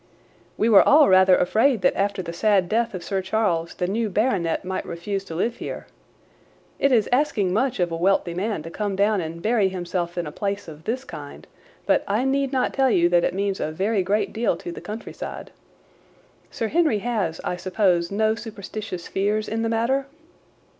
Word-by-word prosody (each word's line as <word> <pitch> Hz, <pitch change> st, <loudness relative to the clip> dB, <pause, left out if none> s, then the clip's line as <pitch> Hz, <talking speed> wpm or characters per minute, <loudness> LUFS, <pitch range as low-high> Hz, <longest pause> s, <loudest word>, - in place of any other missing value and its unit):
"We 220 Hz, -, +2 dB
were 215 Hz, -4 st, +8 dB
all 295 Hz, 0 st, +6 dB
rather 185 Hz, 0 st, +6 dB
afraid 220 Hz, +5 st, +2 dB
that -, -, +3 dB
after 200 Hz, -1 st, -1 dB
the 170 Hz, -, -6 dB
sad 195 Hz, 0 st, +2 dB
death 225 Hz, +1 st, 0 dB
of 180 Hz, -, -6 dB
Sir 195 Hz, -1 st, -2 dB
Charles 185 Hz, -4 st, -1 dB
the 180 Hz, -, -1 dB
new 215 Hz, +4 st, -1 dB
baronet 190 Hz, -6 st, 0 dB
might 190 Hz, 0 st, -3 dB
refuse 195 Hz, +4 st, -4 dB
to 165 Hz, -, -7 dB
live 230 Hz, +7 st, -1 dB
here. -, -, -6 dB, 0.9 s
It 275 Hz, -, +3 dB
is 225 Hz, -5 st, +3 dB
asking 245 Hz, -9 st, +1 dB
much 250 Hz, +3 st, 0 dB
of 175 Hz, -1 st, +1 dB
a -, -, -2 dB
wealthy 175 Hz, 0 st, +1 dB
man 195 Hz, -1 st, -2 dB
to 165 Hz, -, -8 dB
come 205 Hz, +1 st, -2 dB
down 205 Hz, 0 st, +2 dB
and 165 Hz, +1 st, -7 dB
bury 215 Hz, -3 st, +2 dB
himself 175 Hz, -1 st, -4 dB
in 175 Hz, -, -1 dB
a 150 Hz, -, -6 dB
place 200 Hz, +3 st, -3 dB
of 160 Hz, 0 st, -11 dB
this 255 Hz, +4 st, -2 dB
kind, -, -, -10 dB, 0.4 s
but -, -, +2 dB
I 215 Hz, +6 st, 0 dB
need 275 Hz, 0 st, +1 dB
not 260 Hz, -2 st, 0 dB
tell 270 Hz, -1 st, +3 dB
you 175 Hz, -6 st, +3 dB
that 175 Hz, -1 st, +3 dB
it -, -, 0 dB
means 200 Hz, 0 st, -1 dB
a 155 Hz, -, -2 dB
very 195 Hz, +5 st, 0 dB
great 200 Hz, +4 st, 0 dB
deal 225 Hz, -6 st, 0 dB
to 175 Hz, -, -7 dB
the -, -, -8 dB
countryside. 215 Hz, +2 st, -7 dB, 1.0 s
Sir 225 Hz, -, -3 dB
Henry 315 Hz, -6 st, +2 dB
has, 205 Hz, -9 st, -1 dB
I -, -, -2 dB
suppose, 180 Hz, -2 st, +1 dB
no 215 Hz, +2 st, +1 dB
superstitious 210 Hz, -5 st, -7 dB
fears 210 Hz, +2 st, -1 dB
in 225 Hz, +1 st, -2 dB
the 225 Hz, -, 0 dB
matter?" 245 Hz, +5 st, 0 dB
200 Hz, 195 wpm, -23 LUFS, 180-225 Hz, 1.0 s, were